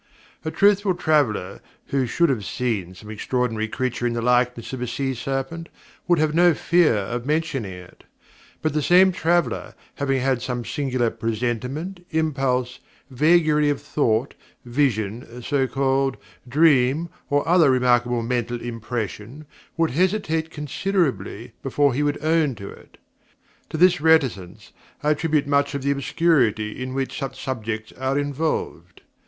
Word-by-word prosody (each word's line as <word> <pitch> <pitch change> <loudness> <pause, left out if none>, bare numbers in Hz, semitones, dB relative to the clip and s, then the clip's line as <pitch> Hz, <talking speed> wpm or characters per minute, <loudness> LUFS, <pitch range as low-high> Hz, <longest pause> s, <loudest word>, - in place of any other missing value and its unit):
A 160 - -2
truthful 200 +1 +3
traveller 135 - 0 0.3
who 135 -2 0
should 170 +7 +2
have 120 -7 -1
seen 100 -6 -3
some 105 +4 -11
extraordinary 110 0 -1
creature 120 +1 -2
in 120 - -1
the 115 - -2
likeness 125 -1 +1
of 130 - -5
a 125 - -2
sea 135 +2 -2
serpent, 135 +7 -4 0.4
would 175 -1 +4
have 155 0 +1
no 175 0 +5
fear 170 -7 +3
of 115 +5 -3
mentioning 145 - -1
it; 90 0 -13 0.6
but 155 -2 0
the 150 - +1
same 185 +5 +5
traveller 175 -1 0 0.2
having 135 -2 0
had 130 -1 0
some 125 -1 -3
singular 130 -5 -1
presentiment, 125 - -3
impulse, 135 -6 -1 0.3
vagary 150 +1 +3
of 145 - 0
thought, 120 -2 0 0.3
vision 120 -2 -1
(so 135 +1 +1
called), 135 +1 0 0.3
dream, 145 +1 +3 0.2
or 145 +1 +1
other 170 -3 +5
remarkable 120 -2 +2
mental 120 0 -2
impression, 115 +3 -5 0.3
would 165 -1 +2
hesitate 165 0 0
considerably 145 - -2
before 140 0 +1
he 140 - -1
would 145 0 0
own 155 -4 +2
to 100 -1 -8
it. - - -17 0.7
To - - -4
this 180 -2 +4
reticence 135 - +1 0.3
I 150 - +3
attribute 155 -1 +1
much 140 0 +1
of 140 - -4
the 140 - +1
obscurity 125 -6 +1
in 130 0 -4
which 135 -1 -3
such 135 -2 -5
subjects 110 -3 -4
are 130 +1 0
involved. 145 +2 -3
135 Hz, 145 wpm, -23 LUFS, 120-155 Hz, 0.7 s, no